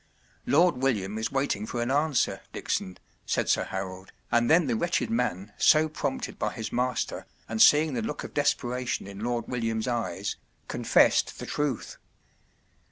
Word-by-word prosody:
“ - - -34
Lord 170 0 +4
William 110 -6 0
is 110 - -2
waiting 135 -6 -1
for 120 - -4
an 120 +2 -1
answer, 145 0 +1
Dickson,” 95 - -3 0.3
said - - 0
Sir - - +2
Harold, 95 0 -6 0.2
and 120 0 +3
then 165 +1 +5
the 120 -4 0
wretched 170 - 0
man, 100 - -1
so 155 0 +5
prompted 155 - -4
by - - -1
his 110 - -6
master 125 -1 -1 0.2
and 110 0 -1
seeing 150 0 +6
the 120 - -1
look 110 - -4
of - - -8
desperation 125 -2 0
in 100 0 -9
Lord 120 -1 -2
William’s 115 -2 -2
eyes, 100 -5 -2 0.3
confessed - - +3
the - - -6
truth. 145 -5 -2
120 Hz, 165 wpm, -27 LUFS, 110-140 Hz, 0.3 s, seeing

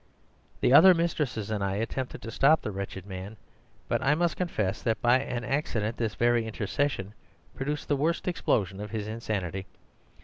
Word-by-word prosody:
The 125 - +4
other 180 +5 +9
mistresses 150 -10 -1
and 105 -2 -1
I 95 0 -1
attempted 120 +4 -3
to 115 - -6
stop 150 +6 +4
the 110 - -3
wretched 95 -1 -6
man, 95 +2 -7 0.5
but - - 0
I 140 +3 +3
must 170 0 +1
confess 110 - -1
that 110 -1 0
by 120 +2 +4
an 125 -3 -3
accident 115 -4 -1
this 110 -3 -2
very 120 -1 +2
intercession 110 -1 -2 0.4
produced 145 +2 -3
the 145 - +2
worst 160 +6 0
explosion 100 - 0
of 105 0 -5
his 110 -2 -4
insanity. 95 -4 -3
115 Hz, 170 wpm, -28 LUFS, 105-145 Hz, 0.5 s, other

